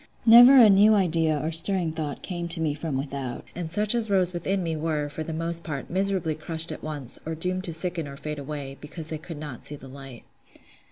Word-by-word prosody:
Never 245 +4 +9
a 235 -4 +9
new 205 +2 +6
idea 165 -5 +1
or 155 +3 -2
stirring 165 +1 +2
thought 155 -3 -5
came 175 -2 -4
to 170 0 -3
me 155 -2 0
from 150 -2 -4
without; 135 -2 -5
and 175 -2 -5
such 210 +5 +2
as 230 -2 0
rose 185 -2 +2
within 185 +2 -1
me 165 -1 -2
were, 155 -2 -2
for 155 - -6
the 160 - -4
most 165 +1 -3
part, 145 -4 -6
miserably 190 -3 0
crushed 160 +1 -3
at - - -7
once, 145 -5 -5
or 160 +1 -4
doomed 185 +3 -2
to 170 - -3
sicken 165 -1 -2
or 140 0 -9
fade 150 +1 -5
away, 140 -1 -7
because 155 +1 -7
they 155 - -4
could 160 0 -9
not 145 -5 -8
see 145 - -2
the 135 - -12
light. 135 -2 -11
160 Hz, 225 wpm, -25 LUFS, 150-180 Hz, -, Never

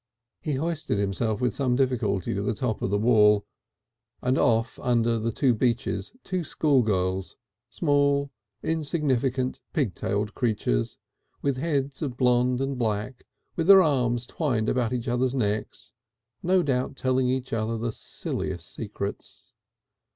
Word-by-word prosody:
He 150 - -2
hoisted 155 -5 -1
himself 105 +3 -1
with 125 -4 +1
some 130 -3 +1
little 135 +1 +4
difficulty 100 -6 -1
to 100 - -2
the 105 +2 -1
top 110 -1 -2
of - - 0
the 100 - +1
wall, 105 -2 +4 0.8
and 125 +1 +2
saw 115 -3 +4
off 115 +1 -6
under 115 -2 +1
the 115 +4 +1
beech 120 +1 +1
trees - - -4
two 185 -2 -2
schoolgirls 105 - +1 0.3
small, 140 -2 +2 0.3
insignificant, 140 -5 0
pig 135 - 0
tailed 105 +1 -2
creatures, 105 - 0 0.5
with 140 -2 +1
heads 140 -2 -1
of 130 -5 -3
blond 125 0 +3
and 135 -1 -2
black, 110 +2 -2 0.3
with 165 0 -1
their 195 -1 +9
arms 125 -6 +1
twined 120 -7 -1
about 120 -3 +1
each 125 0 -3
other's 125 +2 +1
necks, 105 -4 -2 0.5
no 185 +1 +3
doubt 135 -1 -1
telling 130 -1 +1
each 130 -1 -2
other 115 0 -1
the 115 +1 -2
silliest - - -5
secrets. - - -6
125 Hz, 145 wpm, -26 LUFS, 110-140 Hz, 0.8 s, their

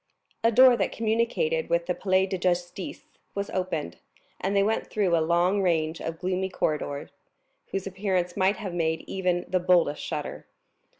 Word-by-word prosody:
A 230 - +5
door 255 +2 +7
that 195 - 0
communicated 235 - 0
with - - +1
the - - 0
Palais 190 -1 +2
de 190 - -3
Justice 175 +1 -2 0.3
was 200 0 -3
opened, 180 - -3 0.4
and 195 +2 -1
they 200 - +4
went 220 +2 0
through 195 -5 +1
a 165 - +2
long 175 +5 +2
range 165 -3 0
of 165 0 -4
gloomy 185 +2 -1
corridors, 150 -5 -2 0.6
whose 195 -1 -3
appearance 190 -2 -1
might 195 +1 +3
have 195 -5 -5
made 160 -2 0
even 180 -2 -1
the 185 - +1
boldest 175 -4 +3
shudder. - - -5
185 Hz, 165 wpm, -27 LUFS, 175-200 Hz, 0.6 s, door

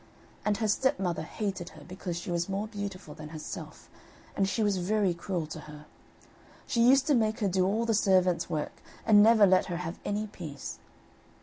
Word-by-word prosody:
And 210 -1 +1
her 220 - 0
stepmother 195 -6 +1
hated 195 -5 -4
her - - -12
because 180 -1 -5
she 175 +1 -5
was 170 +1 -1
more 195 +2 -1
beautiful 200 -6 -6
than 155 0 -9
herself, 155 -1 -8 0.5
and 195 -1 +1
she 220 - 0
was 205 -2 +2
very 195 +1 +1
cruel 170 -1 -3
to 155 +1 -7
her. 150 0 -11 0.8
She 235 - 0
used 265 +3 +6
to 295 - +3
make 220 -3 +2
her 205 - +1
do 185 0 +2
all 220 +4 +1
the 230 - +1
servant's 185 -5 +3
work, 155 -3 -4 0.2
and 210 -2 +7
never 220 -1 +7
let 185 -1 +4
her 175 -2 -3
have 175 0 -5
any 210 +1 -1
peace. 160 -9 -8
195 Hz, 190 wpm, -29 LUFS, 175-215 Hz, 0.8 s, and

